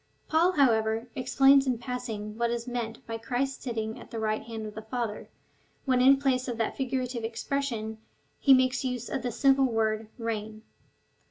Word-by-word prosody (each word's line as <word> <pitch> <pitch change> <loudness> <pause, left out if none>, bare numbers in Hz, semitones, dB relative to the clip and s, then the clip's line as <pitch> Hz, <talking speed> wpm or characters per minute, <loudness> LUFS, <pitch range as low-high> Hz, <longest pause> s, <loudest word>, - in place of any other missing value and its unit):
Paul, 335 +4 +3
however, 225 -4 +2
explains 270 +1 +4
in 250 -2 +1
passing 230 -4 -5
what 235 +1 0
is 235 +1 -3
meant 235 -2 -4
by 225 0 -5
Christ's 255 +4 -2
sitting 225 -3 -3
at - - -12
the 230 - -6
right 215 -1 -1
hand 225 -1 -6
of 210 - -7
the 220 - -7
Father, 220 -1 -4 0.6
when 255 -2 +3
in 270 +2 +7
place 265 -2 0
of 240 -2 -3
that 225 - -1
figurative 255 -2 -2
expression 225 -1 -3 0.4
he 275 - +4
makes 255 0 +2
use 250 -2 -3
of 265 - -2
the 245 0 -2
simple 270 +3 +4
word 220 -2 0
reign. 220 -2 -4
240 Hz, 175 wpm, -28 LUFS, 220-260 Hz, 0.6 s, in